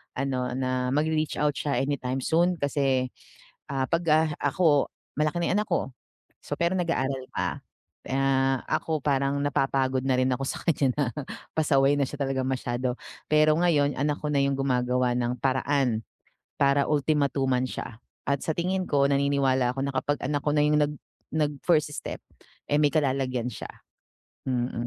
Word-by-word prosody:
ano, 130 Hz, -1 st, -1 dB
na 130 Hz, 0 st, -1 dB
magre-reach 155 Hz, 0 st, 0 dB
out 150 Hz, -, +3 dB
siya 145 Hz, -2 st, -1 dB
anytime 135 Hz, -2 st, -2 dB
soon 175 Hz, +2 st, +2 dB
kasi, 135 Hz, -3 st, +1 dB, 0.6 s
ah, 135 Hz, -1 st, 0 dB
'pag, 165 Hz, +4 st, 0 dB
ah, 155 Hz, +1 st, +4 dB
ako 145 Hz, 0 st, +3 dB, 0.3 s
malaki 155 Hz, +2 st, +1 dB
na 170 Hz, -, 0 dB
yung 195 Hz, -, +2 dB
anak -, -, -10 dB
ko 135 Hz, -, 0 dB, 0.5 s
so -, -, -3 dB
pero 170 Hz, +1 st, +1 dB
nag-aaral 135 Hz, -6 st, -1 dB
pa. -, -, -2 dB, 0.5 s
Ah, 135 Hz, -1 st, +2 dB
ako 160 Hz, -2 st, -1 dB
parang 140 Hz, 0 st, +1 dB
napapagod 135 Hz, -2 st, +1 dB
na 135 Hz, -, +2 dB
rin 130 Hz, 0 st, +2 dB
ako 135 Hz, +2 st, -1 dB
sa -, -, -3 dB
kaniya 140 Hz, -6 st, +2 dB
na 145 Hz, -5 st, 0 dB, 0.5 s
pasaway 145 Hz, -2 st, +3 dB
na 140 Hz, -, +3 dB
siya 145 Hz, +1 st, -8 dB
talaga 135 Hz, -1 st, 0 dB
masyado, 125 Hz, -1 st, -2 dB, 0.4 s
pero 155 Hz, 0 st, +5 dB
ngayon 150 Hz, -5 st, +2 dB
anak 145 Hz, +1 st, 0 dB
ko 150 Hz, -, -3 dB
na 140 Hz, -, +2 dB
'yung 140 Hz, -, +1 dB
gumagawa 125 Hz, -2 st, +1 dB
ng 125 Hz, 0 st, -1 dB
paraan 130 Hz, -3 st, +1 dB, 0.5 s
para 140 Hz, 0 st, +3 dB
ultimatuman 140 Hz, -3 st, +1 dB
siya. 115 Hz, -2 st, -6 dB, 0.3 s
At 140 Hz, -1 st, +1 dB
sa 160 Hz, -, 0 dB
tingin 185 Hz, +2 st, -1 dB
ko 140 Hz, -1 st, +3 dB
naniniwala 135 Hz, -3 st, +2 dB
ako 135 Hz, -, -4 dB
na -, -, -1 dB
kapag 145 Hz, +2 st, 0 dB
anak 145 Hz, +1 st, -1 dB
ko 150 Hz, -, +2 dB
na 150 Hz, -, +4 dB
'yung 150 Hz, 0 st, +3 dB
nag 150 Hz, 0 st, +1 dB, 0.4 s
nag-first 150 Hz, +1 st, +1 dB
step, -, -, -5 dB, 0.5 s
eh, 145 Hz, -, +3 dB
may 145 Hz, -, +5 dB
kalalagyan 130 Hz, -4 st, 0 dB
siya, -, -, -8 dB, 0.8 s
mm. 120 Hz, -2 st, -1 dB
140 Hz, 165 wpm, -26 LUFS, 130-150 Hz, 0.8 s, pero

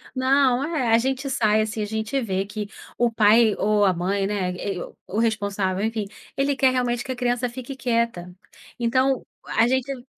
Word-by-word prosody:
Não, 260 Hz, 0 st, +3 dB
é. 295 Hz, -6 st, -1 dB
A 225 Hz, -, +6 dB
gente 265 Hz, +3 st, -1 dB
sai, 220 Hz, -5 st, +2 dB
assim, 220 Hz, 0 st, -3 dB
a -, -, 0 dB
gente 220 Hz, +5 st, -2 dB
vê 195 Hz, -5 st, -1 dB
que 210 Hz, 0 st, -6 dB, 0.3 s
o 240 Hz, 0 st, +3 dB
pai 220 Hz, 0 st, +5 dB
ou 210 Hz, 0 st, +2 dB
a 190 Hz, -, +4 dB
mãe, 195 Hz, +3 st, -1 dB
né, 195 Hz, -3 st, -1 dB
e 180 Hz, 0 st, -4 dB
o -, -, -10 dB, 0.2 s
o 210 Hz, -, -1 dB
responsável, 200 Hz, -4 st, 0 dB
enfim, 220 Hz, -2 st, -2 dB, 0.3 s
ele 280 Hz, +1 st, +1 dB
quer 265 Hz, -1 st, +3 dB
realmente 245 Hz, -1 st, 0 dB
que 265 Hz, -, -8 dB
a -, -, -6 dB
criança 245 Hz, 0 st, 0 dB
fique 255 Hz, +2 st, -7 dB
quieta. 230 Hz, -8 st, -1 dB, 0.5 s
Então, 255 Hz, +2 st, +1 dB, 0.2 s
a 225 Hz, -, +2 dB
gente 260 Hz, 0 st, -1 dB
230 Hz, 190 wpm, -23 LUFS, 205-255 Hz, 0.5 s, A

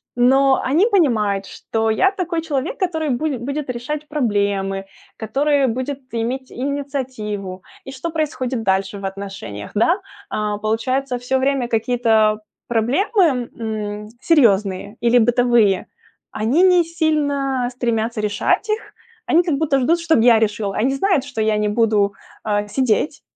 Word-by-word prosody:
но 265 Hz, +2 st, +4 dB
они 310 Hz, +10 st, +3 dB
понимают, 215 Hz, -, +2 dB
что 225 Hz, 0 st, -2 dB
я 380 Hz, -, +3 dB
такой 350 Hz, -4 st, -2 dB
человек, 300 Hz, -2 st, -3 dB
который 320 Hz, -5 st, -1 dB
буде 270 Hz, +2 st, -1 dB
будет 280 Hz, +4 st, -4 dB
решать 285 Hz, +5 st, -4 dB
проблемы, 200 Hz, -8 st, -1 dB, 0.3 s
который 275 Hz, +5 st, +1 dB
будет 260 Hz, +4 st, -3 dB
иметь 245 Hz, +3 st, -3 dB
инициативу. 255 Hz, -9 st, -4 dB, 0.2 s
И 270 Hz, -, -7 dB
что 270 Hz, +5 st, -5 dB
происходит 265 Hz, -7 st, -2 dB
дальше 195 Hz, 0 st, 0 dB
в 195 Hz, -, -6 dB
отношениях, 190 Hz, -, -7 dB
да? 335 Hz, -, +3 dB, 0.3 s
А 210 Hz, -1 st, -2 dB
получается, 250 Hz, +5 st, -1 dB
всё 260 Hz, +2 st, 0 dB
время 270 Hz, -2 st, 0 dB
какие-то 220 Hz, -2 st, +2 dB, 0.3 s
проблемы, 260 Hz, -, +1 dB
м, 210 Hz, -2 st, -4 dB
серьёзные 205 Hz, -, +2 dB
или 240 Hz, +1 st, +3 dB
бытовые, 240 Hz, -4 st, +3 dB, 0.4 s
они 235 Hz, +11 st, +2 dB
не 360 Hz, -2 st, +5 dB
сильно 285 Hz, -6 st, 0 dB
стремятся 230 Hz, -2 st, -1 dB
решать 210 Hz, -, 0 dB
их. 430 Hz, +1 st, -3 dB, 0.3 s
Они 340 Hz, +2 st, +4 dB
как 325 Hz, -5 st, 0 dB
будто 285 Hz, -2 st, +1 dB
ждут, 330 Hz, +7 st, +2 dB
чтоб 325 Hz, -5 st, +3 dB
я 235 Hz, -1 st, +6 dB
решила. 205 Hz, -2 st, -1 dB
Они 260 Hz, +5 st, +1 dB
знают, 335 Hz, -3 st, +1 dB
что 275 Hz, -6 st, -4 dB
я 215 Hz, -1 st, +2 dB
не 210 Hz, 0 st, 0 dB
буду, 210 Hz, -2 st, +2 dB, 0.3 s
а, 205 Hz, -1 st, -1 dB
сидеть, 260 Hz, +5 st, 0 dB
245 Hz, 140 wpm, -20 LUFS, 215-285 Hz, 0.4 s, я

